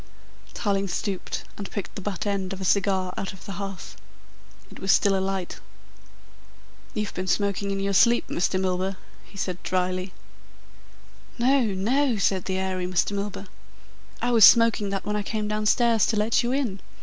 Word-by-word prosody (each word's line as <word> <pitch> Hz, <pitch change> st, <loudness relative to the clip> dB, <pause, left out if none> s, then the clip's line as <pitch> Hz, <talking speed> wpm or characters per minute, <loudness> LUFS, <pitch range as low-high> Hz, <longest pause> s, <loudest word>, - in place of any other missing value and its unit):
Tarling 200 Hz, -2 st, 0 dB
stooped 195 Hz, 0 st, -3 dB, 0.2 s
and 200 Hz, -, -5 dB
picked 200 Hz, -, -5 dB
the -, -, -7 dB
butt 200 Hz, 0 st, -4 dB
end 195 Hz, -2 st, -2 dB
of 195 Hz, -, -7 dB
a 190 Hz, -, -4 dB
cigar 190 Hz, -1 st, +1 dB
out 195 Hz, -, -4 dB
of 190 Hz, -, -14 dB
the -, -, -6 dB
hearth. 195 Hz, -1 st, -6 dB, 0.8 s
It -, -, -12 dB
was 190 Hz, -, +2 dB
still 200 Hz, -1 st, +4 dB
alight. 190 Hz, -1 st, -2 dB, 1.4 s
"You've 210 Hz, -1 st, -2 dB
been 185 Hz, +1 st, -4 dB
smoking 200 Hz, +1 st, 0 dB
in 195 Hz, 0 st, -2 dB
your 200 Hz, 0 st, -1 dB
sleep, 235 Hz, +5 st, +4 dB
Mr. 185 Hz, +2 st, 0 dB
Milburgh," 190 Hz, +1 st, -1 dB, 0.3 s
he 200 Hz, -, -16 dB
said 185 Hz, -1 st, -3 dB
dryly. 185 Hz, 0 st, -1 dB, 1.3 s
"No, 260 Hz, +3 st, +3 dB
no," 245 Hz, +5 st, +1 dB
said 190 Hz, -2 st, +1 dB
the 190 Hz, -1 st, -2 dB
airy 185 Hz, -1 st, -2 dB
Mr. 180 Hz, +2 st, +1 dB
Milburgh. 200 Hz, 0 st, -4 dB, 0.8 s
"I 245 Hz, -, +2 dB
was 230 Hz, -3 st, +5 dB
smoking 230 Hz, -3 st, +6 dB
that 195 Hz, -1 st, -3 dB
when 210 Hz, -, -1 dB
I 210 Hz, -, 0 dB
came 215 Hz, +1 st, -3 dB
downstairs 215 Hz, +1 st, +2 dB
to 225 Hz, -, 0 dB
let 215 Hz, +2 st, +2 dB
you 240 Hz, 0 st, -1 dB
in. 255 Hz, -8 st, -1 dB
200 Hz, 170 wpm, -25 LUFS, 190-210 Hz, 1.4 s, smoking